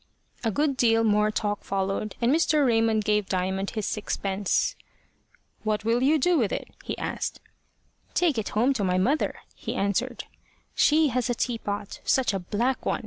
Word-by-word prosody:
A 225 - +1
good 280 +4 0
deal 225 -2 +4
more 210 -1 +3
talk 205 -1 -2
followed, 195 +1 -2
and 235 +1 +2
Mr. 305 -2 +3
Raymond 225 -3 +2
gave 210 -2 +1
Diamond 190 +1 -1
his 215 -3 -3
sixpence. 200 -2 -1 0.9
"What 215 -1 -1
will 230 +2 +2
you 290 +4 +4
do 340 +3 +3
with 220 -5 +1
it?" - - -4
he - - -4
asked. - - -3 0.8
"Take 320 -9 +2
it 215 - -3
home 250 +5 +4
to 225 -6 -2
my 180 -1 +1
mother," 265 +12 +1 0.2
he - - -5
answered. 235 +6 -1 0.5
"She 310 0 +4
has 250 -1 -1
a 245 - +1
teapot 210 -4 -3
such 260 -5 +2
a 195 - -1
black 235 +8 -1
one! - - 0
225 Hz, 170 wpm, -26 LUFS, 205-255 Hz, 0.9 s, deal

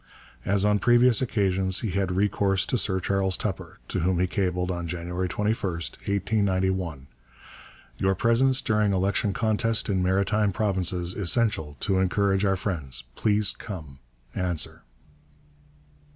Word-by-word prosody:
As 100 +1 +2
on 105 0 +3
previous 120 +1 +4
occasions, 95 -5 0
he 110 - -2
had 95 0 -1
recourse 95 0 +1
to 125 - 0
Sir 95 -2 0
Charles 95 0 0
Tupper, 95 -5 -4
to - - -1
whom 90 +1 +1
he 90 - +3
cabled 90 -1 -1
on 85 -1 -4
January 90 +2 -3
21, 105 +5 0 0.2
1891: 95 -3 -1 0.9
'Your 95 0 +2
presence 125 +6 +2
during 105 -2 +1
election 95 +2 +1
contest 110 +1 0
in 95 -2 +1
Maritime 100 +3 +1
Provinces 95 -3 -1
essential 100 - 0
to 95 -2 +1
encourage 95 +1 +1
our 95 -1 +2
friends. 75 - -2
Please 105 - +2
come. 80 -11 -9 0.3
Answer.' 90 -3 -2
95 Hz, 130 wpm, -26 LUFS, 90-105 Hz, 0.9 s, previous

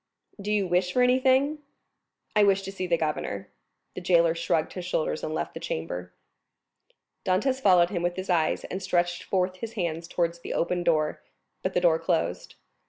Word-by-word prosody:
"Do 205 +1 -3
you 205 -2 +2
wish 180 0 +1
for 250 - +4
anything?" 260 +4 +3 0.8
"I 210 - +6
wish 195 -1 +3
to 195 - -5
see 185 -2 -4
the 170 -1 +2
governor." 150 -11 -3 0.4
The - - -6
jailer 170 -2 +4
shrugged 165 -1 0
his 180 - -5
shoulders 165 -3 -1
and - - -2
left 155 - -3
the - - -6
chamber. 90 +2 -4 1.1
Dantès 255 +9 +1
followed 180 -5 +5
him 175 -4 -1
with 175 0 0
his 185 +1 -5
eyes, 170 -4 +1
and 190 - -5
stretched 175 -2 0
forth 185 -1 -1
his 225 +4 -6
hands 170 -5 -3
towards 170 -1 -1
the - - -5
open 175 +1 0
door; 155 -3 +1 0.4
but 185 - -2
the 180 - +3
door 165 -2 +4
closed. - - -1
180 Hz, 180 wpm, -27 LUFS, 170-195 Hz, 1.1 s, I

